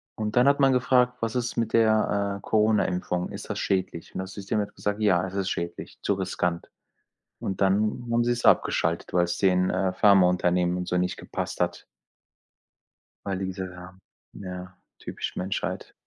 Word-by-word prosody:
Und 105 +1 -3
dann 125 +3 +5
hat 140 0 +4
man 135 -1 +5
gefragt: 125 -1 +3
„Was 115 +1 -2
ist 120 -1 -2
mit 115 -1 -1
der, 105 -3 +2
äh, - - -13
Corona-Impfung? 100 -5 +1
Ist - - -8
das - - -3
schädlich?‟ 95 -3 -2
Und - - -3
das 95 0 -5
System 100 +1 -2
hat 100 - -3
gesagt: 105 +1 -3
„Ja, 95 -4 +3
es 95 - -9
ist 100 -1 -1
schädlich, 85 0 -5
zu - - +1
riskant.‟ 85 -1 -2 0.7
Und 95 - -4
dann 105 +5 +1
haben 120 0 +3
sie 120 - +1
es 120 - -4
abgeschaltet, 85 +1 +2
weil 90 -1 +4
es 85 0 -3
den, 90 -1 +3
äh, 95 -1 0
Pharmaunternehmen 90 -2 +3
und 90 0 -4
so 90 - 0
nicht 90 -1 -1
gepasst - - -5
hat. - - -1 1.4
Weil 95 -2 -2
diese 95 0 -4
ja 90 +1 -12 0.4
ja 90 -1 -8 0.2
typisch - - -6
Menschheit. 95 +2 -3
95 Hz, 175 wpm, -26 LUFS, 90-110 Hz, 1.4 s, dann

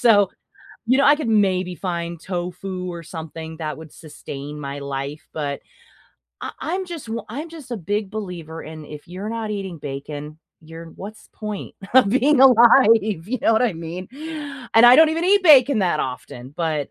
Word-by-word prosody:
So, 205 -5 +5 0.6
you 255 +3 +3
know, 275 - +4
I 290 +1 +6
could 295 -6 -3
maybe 185 -4 +2
find 170 -2 -4
tofu 180 +1 -5
or 170 -1 -7
something 160 0 -8
that 155 -2 -4
would 160 -2 -12
sustain 145 -1 -9
my 140 0 -5
life, 140 +2 -5
but 145 -2 -3 0.8
I - - -4
I'm 370 +3 -2
just 335 -7 -7
w 225 -1 -4
I'm 290 +9 -6
just 315 -6 -12
a 240 - -2
big 205 +2 -3
believer 175 -7 -6
in, 155 -1 -9
if 150 0 -11
you're 185 +4 -6
not 225 -2 -4
eating 195 -5 -5
bacon, 145 +2 -7 0.2
you're 165 +1 -11
what's 210 +3 -10
point 210 -2 -6 0.2
of 260 -6 +7
being 265 +5 +3
alive? 240 -2 +7 0.3
You 255 +2 -1
know 225 - +4
what 220 - +3
I 240 -4 +2
mean, 170 +3 -7 0.7
and 230 +2 +8
I 245 - +9
don't 320 0 +7
even 330 +2 -1
eat 400 +2 +4
bacon 280 -7 +6
that 175 -5 +1
often, 125 0 -6
but, 155 -4 -2
185 Hz, 180 wpm, -22 LUFS, 160-235 Hz, 0.8 s, I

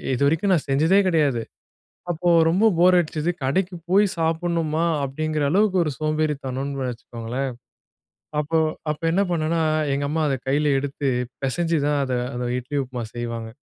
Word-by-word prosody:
இதுவரைக்கும் 160 +9 +2
நான் 155 - -2
செஞ்சதே 160 +8 +4
கிடையாது. 145 -8 +2 0.7
அப்போ 175 +1 -1 0.2
ரொம்ப 190 +7 +3
போர் 180 +1 +6
அடிச்சது. 155 -1 -1
கடைக்கு 180 +7 0 0.2
போய் 200 +3 +5
சாப்பிடணுமா 165 -1 0 0.2
அப்படிங்கிற 155 +2 -2
அளவுக்கு 200 +2 +3
ஒரு 155 - -1
சோம்பேறித்தனம்னு 140 -3 -2
வச்சுக்கோங்களேன். 120 +2 -5 0.9
அப்ப 150 +1 -4 0.4
அப்ப 150 - -6
என்ன 190 +4 +2
பண்ணேன்னா 165 0 0 0.3
எங்க 140 +1 -1
அம்மா 160 +1 0
அதை 135 - +1
கையில 145 +2 +2
எடுத்து 140 +1 -3 0.4
பிசைஞ்சு 165 +5 0
தான் 145 -1 +1
அதை 130 -2 -1 0.2
அந்த 125 0 -3
இட்லி 135 +4 -5
உப்புமா 125 -2 -6
செய்வாங்க. 115 -1 -4
150 Hz, 140 wpm, -23 LUFS, 135-165 Hz, 0.9 s, போர்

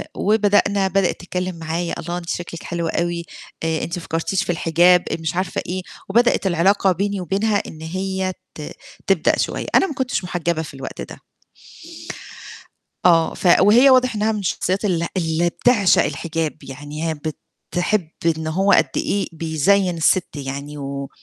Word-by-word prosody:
وبدأنا 205 -1 +2
بدئِت 195 -1 +1
تتكلم 180 0 -3
معايا، 165 +2 -3
الله 170 +1 -4
أنتِ 175 -1 -7
شكلِك 170 -1 -5
حلو 170 -1 -3
أوي، 170 +1 -1 0.4
آآ، 160 -1 0
أنتِ 170 +2 -3
ما 175 - -7
فكّرتيش 165 +4 -1
في - - -1
الحجاب؟ 175 +2 +4 0.2
مش 160 +2 -3
عارفة 185 0 -1
إيه، 185 +1 -3 0.3
وبدئِت 235 -1 +3
العلاقة 190 +2 +3
بيني 200 +2 -1
وبينها 200 +4 +1
إن 155 - -10
هي 185 +3 -2 0.2
ت - - -8 0.5
تبدأ - - +3
شوية، - - -1
أنا - - +5
ما 305 - -5
كنتش 260 -7 -2
محجبة 170 -2 -1
في 155 - -8
الوقت 135 - -7
ده. - - -9 1.8
آه، 165 -2 +5
ف - - -2
وهي 230 +8 +7
واضح 255 -2 +4
إنها 215 +1 +1
من 215 - -2
الشخصيات 190 +1 -1
ال 170 -4 0
اللي 165 0 +1
بتعشق 205 0 +3
الحجاب، 165 -2 -3
يعني 145 +4 -5
هي - - 0 0.6
بتحب 180 0 +1 0.3
إن 160 0 -4
هو 190 +5 +2
قد - - +4
إيه 200 -1 0
بيزيّن 165 +3 +1
السِت 165 +2 +2
يعني 140 +1 -6
و 140 -1 -5
175 Hz, 160 wpm, -21 LUFS, 160-195 Hz, 1.8 s, وهي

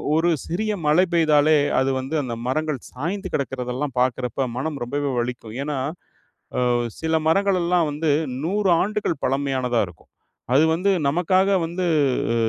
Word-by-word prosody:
ஒரு 165 +2 +3 0.2
சிறிய 210 +6 -1
மழை 155 +5 +5
பெய்தாலே 155 -2 +4 0.2
அது 130 - +1
வந்து 135 +4 -4
அந்த 125 -3 -4
மரங்கள் 155 +2 -1 0.2
சாய்ந்து 185 +9 -4
கிடக்கிறதெல்லாம் 130 0 -3
பாக்குறப்ப 130 +1 -1
மனம் 145 +2 -3
ரொம்பவே 140 +3 -2
வலிக்கும். 120 -2 -4
ஏன்னா 145 -1 -3 0.9
ஆ - - +3 0.3
சில 160 0 -1
மரங்கள் 195 +2 +2
எல்லாம் 170 -2 +2
வந்து 150 +1 -1 0.3
100 195 +3 +1
ஆண்டுகள் 205 -7 -2
பழமையானதா 130 -3 0
இருக்கும். 85 -1 -18 0.4
அது 145 +4 +6
வந்து 180 +5 +1 0.2
நமக்காக 185 +6 +2
வந்து 170 +3 -2 0.5
அ - - 0
150 Hz, 140 wpm, -23 LUFS, 130-175 Hz, 0.9 s, அது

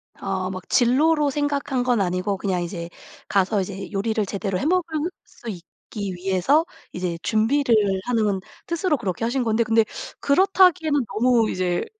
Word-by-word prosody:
아 190 -1 -3
막 185 -1 -7
진로로 290 +5 +3
생각한 285 -2 -1
건 245 -4 +2
아니고 185 +2 -1
그냥 190 -2 -1
이제 170 -1 -6 0.4
가서 200 +1 +2
이제 195 +1 -6
요리를 215 +1 -1
제대로 195 -1 -3
해 - - -3
먹을 330 -1 0 0.2
수 235 - -11
있기 195 +2 -7
위해서 195 - +2 0.3
이제 180 -2 -3
준비를 230 +5 +2 0.3
하는 215 -5 +1 0.3
뜻으로 340 -2 0
그렇게 195 -1 -3
하신 250 +2 0
건데 225 0 +2
근데 225 0 +3 0.3
그렇다기에는 330 -3 +3
너무 230 0 +2
이제 180 -1 -1
225 Hz, 320 characters per minute, -23 LUFS, 190-285 Hz, 0.4 s, 진로로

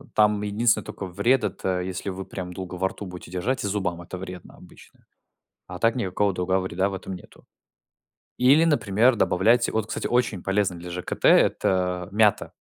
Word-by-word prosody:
там 105 -1 +3
единственное, 110 +3 +1
тока 100 - -7
вред- 120 +9 +1
это 90 -1 -2
если 95 +2 -4
вы 95 0 -6
прям 90 -1 -7
долго 90 0 -7
во 95 +1 0
рту 100 - -9
будете 90 -1 -10
держать, 115 +9 -2
и 100 - -1
зубам 95 -4 -2
это 90 +2 -8
вредно 90 -1 -9
обычно. - - -18 0.6
А 90 0 -8
так 115 +1 +2
никакого 100 -3 0
другого 95 +1 0
вреда 95 +1 -1
в 100 - -7
этом 95 0 -6
нету. 90 - -15 0.9
Или, 140 +6 +5
например, 120 -6 +3
добавляйте 115 +5 +3
Вот, 110 -1 -1
кстати, - - -4
очень 120 -7 0
полезно 95 -2 0
для 90 +1 -9
ЖКТ- 90 +1 -6
это 90 -1 +3
мята. 105 0 +2
95 Hz, 175 wpm, -24 LUFS, 90-110 Hz, 0.9 s, Или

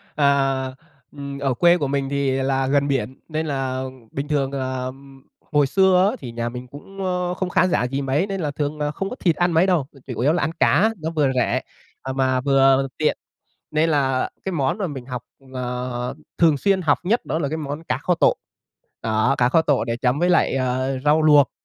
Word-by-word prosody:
Ờ, 135 -2 +1 0.4
ừm, 140 -1 -7
ở 135 -2 0
quê 175 +7 +4
của 145 -5 -1
mình 135 0 -1
thì 140 -1 0
là 135 0 0
gần 140 +1 +2
biển 130 -2 -2
nên 155 0 -2
là 135 -3 -2 0.3
bình 140 +1 -4
thường, 140 -3 0
à, 130 -2 -3 0.7
hồi 145 -2 +3
xưa 190 +3 +4
á - - -5
thì 125 -3 -7
nhà 120 0 -3
mình 125 +1 -8
cũng, 190 +9 -8
ơ, 180 -1 -1
không 185 0 -3
khá 180 - +3
giả 175 - +1
gì 135 +3 -2
mấy 140 +7 0
nên 195 -2 -3
là 150 -3 -1
thường 145 +1 -3
là 145 0 -1
không 195 +6 -4
có - - -6
thịt 170 -9 +1
ăn 175 +2 +1
mấy 165 +3 +3
đâu 175 -7 +2
mà 135 - -17
chủ 125 - -5
yếu 140 +6 +3
là 175 - 0
ăn 155 - 0
cá 195 +10 +4
nó 160 - -2
vừa 145 -4 +2
rẻ, 125 - +1 0.4
à, 130 - -4
mà 130 -1 +1
vừa 135 0 +4
tiện 155 - +1 0.5
nên 155 +2 +2
là 135 -3 +1
cái 190 - -2
món 150 +2 0
mà 200 - -1
mình 135 -6 -7
học 125 -2 -5 0.3
ờ, 125 0 -3 0.2
thường 160 -3 +5
xuyên 195 +3 +2
học 150 -4 +3
nhất 215 +7 0
đó 160 - -1
là 145 -4 -1
cái 155 - -3
món 150 +1 -5
cá 125 -4 -1
kho 180 +5 +1
tộ, - - +3 0.7
đó 110 +4 +2
cá 120 - +4
kho 160 +5 +3
tộ 145 -6 +1
để 115 0 -2
chấm 125 +3 0
với 175 +2 +2
lại, 175 - +3
ờ, 130 +1 -1
rau 150 +2 +4
luộc. 150 -2 +5
140 Hz, 225 wpm, -22 LUFS, 130-160 Hz, 0.7 s, thường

